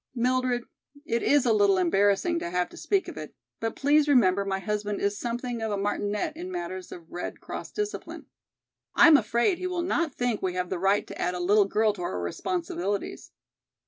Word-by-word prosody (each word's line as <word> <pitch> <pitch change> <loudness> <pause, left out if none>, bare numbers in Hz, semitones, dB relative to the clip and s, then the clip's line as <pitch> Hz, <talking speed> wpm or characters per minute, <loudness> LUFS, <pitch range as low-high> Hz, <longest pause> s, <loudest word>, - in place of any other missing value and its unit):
"Mildred, 250 0 +1 0.4
it 235 -7 0
is 285 -3 +3
a 230 - +4
little 200 -2 +4
embarrassing 200 - +2
to - - -4
have 180 0 0
to - - -14
speak 395 -2 0
of - - -8
it, - - -8 0.2
but 225 -1 -3
please 295 +2 +3
remember 200 -9 +4
my 195 -1 -1
husband 210 +1 -2
is 200 0 0
something 240 +1 -4
of 220 -1 -2
a 205 - -1
martinet 205 0 -2
in 180 - -6
matters 180 +1 -5
of 170 -1 -11
Red 175 - -5
Cross - - -7
discipline. 420 0 -5 0.7
I - - +7
am 320 - +8
afraid 235 - +2
he 365 - -2
will 360 -1 -2
not 340 -5 -1
think 245 -3 -1
we 185 -1 -2
have 180 -1 -2
the 185 - -1
right 195 +3 +2
to - - -8
add 180 - 0
a - - -4
little 200 +3 +4
girl 215 +2 +2
to 195 - -9
our 95 - -3
responsibilities. 180 - -3
205 Hz, 205 wpm, -27 LUFS, 185-250 Hz, 0.7 s, am